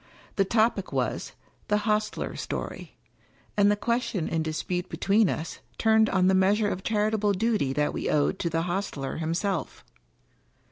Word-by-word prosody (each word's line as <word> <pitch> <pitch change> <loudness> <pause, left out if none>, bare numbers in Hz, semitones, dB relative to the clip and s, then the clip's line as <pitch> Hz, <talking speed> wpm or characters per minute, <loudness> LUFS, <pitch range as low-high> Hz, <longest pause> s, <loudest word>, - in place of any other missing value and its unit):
The 195 - +3
topic 220 -1 +1
was - - -2 0.2
" - - -36
The 210 0 +1
Hostler's 215 -1 -1
Story"; - - -6 0.6
and 205 0 +5
the 205 - +3
question 210 -4 -1
in 165 - 0
dispute 170 +3 -3
between 200 0 +2
us 160 +1 -4 0.2
turned 220 -1 +4
on 185 -1 +2
the 190 - +4
measure 205 +3 +3
of 185 - -3
charitable 210 0 +1
duty 210 - +1
that 150 +1 0
we - - -2
owed 150 +6 +1
to 170 - -1
the 165 0 0
hostler 175 -6 -3
himself. 165 +3 -2
200 Hz, 155 wpm, -27 LUFS, 170-215 Hz, 0.6 s, and